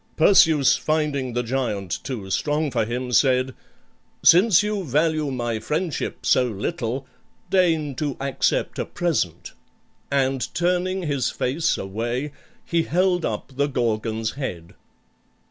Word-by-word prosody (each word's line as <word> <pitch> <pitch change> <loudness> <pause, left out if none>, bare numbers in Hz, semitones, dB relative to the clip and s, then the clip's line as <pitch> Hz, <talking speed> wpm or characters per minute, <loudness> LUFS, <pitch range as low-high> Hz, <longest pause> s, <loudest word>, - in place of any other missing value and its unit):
Perseus, 160 -5 +5
finding 150 -5 -1
the 125 +1 -1
giant 110 -7 -2
too 120 -8 -5
strong 150 +5 0
for 115 -3 0
him, 125 +2 -4
said, 130 +1 +3 0.7
"Since 185 +3 +6
you 210 -2 -2
value 155 +1 +1
my 120 -4 -2
friendship 155 - -3
so 125 - +4
little, 120 - -3 0.5
deign 165 -6 +2
to 145 -4 -2
accept 135 -1 -1
a - - -1
present;" 150 - -2 0.6
and 135 -2 0
turning 180 +1 0
his 140 -5 0
face 140 +6 0
away, 120 +8 -3 0.3
he 170 -1 +1
held 180 +1 +1
up 110 +4 -4
the 140 +2 +1
Gorgon's 115 -4 -1
head. 90 - -6
140 Hz, 125 wpm, -23 LUFS, 120-160 Hz, 0.7 s, Since